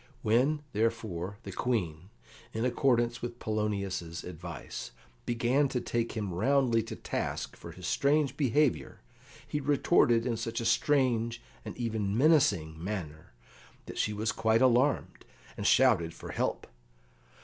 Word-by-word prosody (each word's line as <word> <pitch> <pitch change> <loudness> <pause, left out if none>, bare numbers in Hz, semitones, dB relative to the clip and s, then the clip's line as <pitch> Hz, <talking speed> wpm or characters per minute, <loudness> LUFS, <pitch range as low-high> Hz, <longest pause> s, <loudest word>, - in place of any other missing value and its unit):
When, 135 +8 +2
therefore, 105 -4 -2
the - - -7
Queen, 90 -8 -2 0.5
in 110 +2 0
accordance 120 -1 +1
with 120 0 -5
Polonius's 100 -6 -3
advice, 85 -7 -7 0.4
began 120 +4 +2
to 130 - -2
take 115 -1 -2
him 105 -5 -3
roundly 120 +3 +2
to 110 - -7
task - - -4
for - - -10
his - - -10
strange 140 -1 +2
behaviour, 145 -1 +1 0.5
he 150 - -2
retorted 125 -4 +3
in 120 -3 -1
such 115 0 -3
a 115 - -3
strange, 120 -2 +2 0.2
and - - -8
even 110 -4 -1
menacing, 90 - +3
manner 85 - -6 0.5
that - - -7
she 105 - +1
was 105 +1 -1
quite 115 +2 +2
alarmed, 130 +3 +2 0.3
and 100 - -2
shouted 95 -11 +4
for - - -8
help. - - -2
115 Hz, 135 wpm, -30 LUFS, 100-125 Hz, 0.5 s, shouted